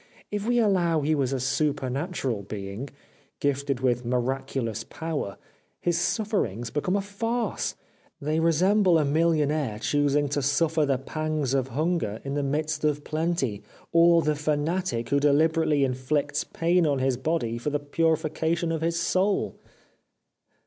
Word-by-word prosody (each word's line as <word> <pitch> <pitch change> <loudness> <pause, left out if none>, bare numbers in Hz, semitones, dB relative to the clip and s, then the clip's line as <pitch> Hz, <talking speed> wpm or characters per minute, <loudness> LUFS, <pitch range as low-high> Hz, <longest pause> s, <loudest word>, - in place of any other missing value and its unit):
If 205 +1 -2
we 240 0 +3
al 215 -3 +4
low 170 -4 +2
he 150 +2 +1
was 135 -4 0
a 135 - -1
supernatural 135 - -1
being, 100 +5 -6 0.5
gifted 140 -2 -1
with 125 -1 +1
miraculous 125 -2 -2
power, 155 -11 -4 0.4
his 175 - 0
sufferings 170 - -1
became 165 +6 0
a 200 - +1
farce; 225 +2 -2 0.4
they 155 +2 0
resemble 180 +3 +4
a 155 - +2
millionaire 150 -5 +1
choosing 145 +4 +1
to 145 +1 0
suffer 150 +2 +2
the 135 -2 +2
pangs 155 0 -2
of 135 -2 +1
hunger 150 - -1
in 140 - -4
the 145 - 0
midst 150 +2 -1
of 150 -1 +1
plenty, 155 - -1 0.3
or 170 0 +5
the 150 - +2
fanatic 150 -4 -1
who 140 - +3
deliberately 155 +1 +3
inflicts 140 +3 0
pain 170 0 +1
on 140 -2 +1
his 130 -1 +1
body 130 -4 -1
for 135 - -2
the 145 - 0
purification 160 +2 0
of 160 -1 -2
his 165 +1 0
soul.' 190 +4 +1
150 Hz, 145 wpm, -26 LUFS, 135-165 Hz, 0.5 s, or